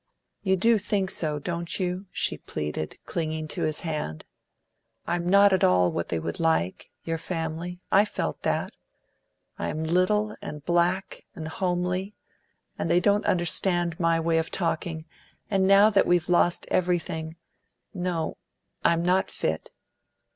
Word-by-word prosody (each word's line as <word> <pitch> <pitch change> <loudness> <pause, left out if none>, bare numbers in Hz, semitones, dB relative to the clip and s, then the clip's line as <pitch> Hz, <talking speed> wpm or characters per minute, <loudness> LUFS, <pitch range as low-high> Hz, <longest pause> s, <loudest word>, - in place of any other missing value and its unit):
You 190 -2 +2
do 225 +4 +3
think 195 -1 0
so, 155 -2 -1
don't 170 +4 -3
you?" 185 +1 -2
she - - 0
pleaded, 75 0 -4
clinging 155 -2 -3
to - - -4
his 155 -1 -1
hand. 150 - -4 0.8
"I 170 - -1
am 175 0 -2
not 200 +1 +6
at 190 - +2
all 90 -1 +4
what 85 - -3
they 85 - 0
would 85 +1 -4
like 160 - 0
your 165 0 -2
family; 165 +1 -4
I 200 +2 +6
felt 210 - -3
that. - - -1 0.9
I - - -1
am 155 - -3
little, 185 +6 +1
and 150 -1 -7
black, 175 +3 0
and 160 -4 -6
homely, 180 +3 -1 0.6
and - - -1
they 175 - +5
don't 205 +3 +2
understand 175 -1 +1
my 165 -1 +2
way 165 0 +2
of 160 - -2
talking, 165 -2 -2 0.5
and 190 -1 +3
now 200 +2 +7
that 200 - +3
we've 175 -1 +2
lost 175 0 +3
everything 165 -3 0 0.6
No, 175 -3 -2 0.5
I'm 170 0 +3
not 185 +2 +2
fit. 80 0 -2
175 Hz, 150 wpm, -26 LUFS, 160-185 Hz, 0.9 s, now